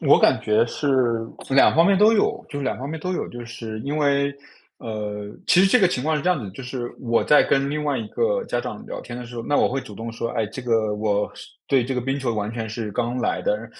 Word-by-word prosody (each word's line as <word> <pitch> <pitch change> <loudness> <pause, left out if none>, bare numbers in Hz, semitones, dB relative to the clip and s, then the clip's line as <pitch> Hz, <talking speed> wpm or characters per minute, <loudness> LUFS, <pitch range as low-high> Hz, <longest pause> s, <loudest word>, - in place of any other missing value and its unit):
我 - - +5
感 - - +4
觉 110 +2 +3
是 145 +4 -3 0.6
两 135 +1 +5
方 165 +2 +5
面 200 -1 +4
都 210 +2 +6
有， 215 - +1
就 145 - -5
是 140 - -3
两 130 - -1
方 135 - -5
面 160 +2 -4
都 180 +4 -2
有。 180 - -3
就 120 0 -8
是 115 -2 -7
因 140 +6 -3
为 140 -1 +2 0.4
呃， 105 -2 -5 0.2
其 180 - +5
实 195 - +6
这 220 +6 +5
个 195 - +5
情 130 -8 -2
况 155 +2 +1
是 150 - -3
这 180 - +2
样 180 - +2
子 120 - -6
的， - - -7
就 135 - -9
是 125 -1 -5
我 115 -2 +1
在 150 - +6
跟 135 0 +1
另 150 +1 -2
外 145 -3 0
一 110 - -4
个 - - 0
家 - - -1
长 - - -7
聊 - - -6
天 120 0 -8
的 125 - -7
时 120 +1 -10
候， 115 - -4
那 145 - 0
我 - - +4
会 135 +2 -2
主 105 - -11
动 115 +3 -6
说： 115 +1 -3
“哎， 110 - +1
这 125 +5 -8
个 110 -3 +1
我 105 -1 0
是 - - -11 0.2
对 130 -3 +3
这 135 +2 -3
个 125 - 0
冰 135 +3 -2
球 125 -4 -1
完 105 0 -2
全 115 -2 -4
是 110 -1 -4
刚 120 +3 -1
来 125 - -1
的。” - - -1
125 Hz, 305 characters per minute, -23 LUFS, 115-145 Hz, 0.6 s, 都